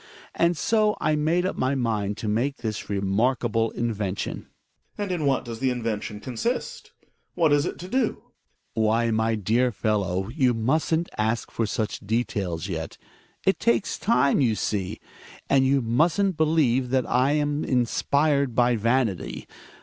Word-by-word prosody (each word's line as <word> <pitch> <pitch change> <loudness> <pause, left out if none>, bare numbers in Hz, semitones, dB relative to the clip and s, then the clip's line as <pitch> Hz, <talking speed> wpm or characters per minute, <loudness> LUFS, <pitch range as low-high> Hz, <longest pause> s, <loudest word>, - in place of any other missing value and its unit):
^nd 170 +1 +3
so 215 +4 +2
I 155 0 +1
made 160 +4 +1
up 185 - -1
my 130 +2 0
mind 110 -5 -1
to 110 - -5
make 120 +7 0
this 110 -3 -5
remarkable 115 +3 +1
invention. 105 -5 -3 0.5
Gregers. - - -35
And 205 -2 -3
in 170 -5 -1
what 135 -1 +1
does 115 -1 -6
the 130 - +1
invention 115 -4 -3
consist? 180 - -4 0.4
What 160 -4 +3
is 145 0 +2
it - - -5
to 180 - -8
do? 245 +2 -1 0.5
Hjai.mar. 110 - +1
Why, 115 +2 +2
my 110 +1 +1
dear 115 +5 +1
fellow, 95 -3 -1
you 125 -2 +2
musn't 160 +8 +1
ask 110 +2 -1
for 115 - -1
such 110 0 -2
details 100 -6 -2
yet. 80 -3 -5 0.5
It 190 - +2
takes 235 -3 +1
time, 150 -11 +3
you 115 -5 +2
see. 100 -3 -2 0.5
And 135 -1 +3
you 135 -1 +2
musn't 165 - +2
believe 150 -6 +2
that 130 -1 +1
I 130 +3 +2
am 145 0 0
inspired 140 +2 +1
by 120 -1 +3
vanity. 115 -3 -1
125 Hz, 155 wpm, -25 LUFS, 110-150 Hz, 0.5 s, ^nd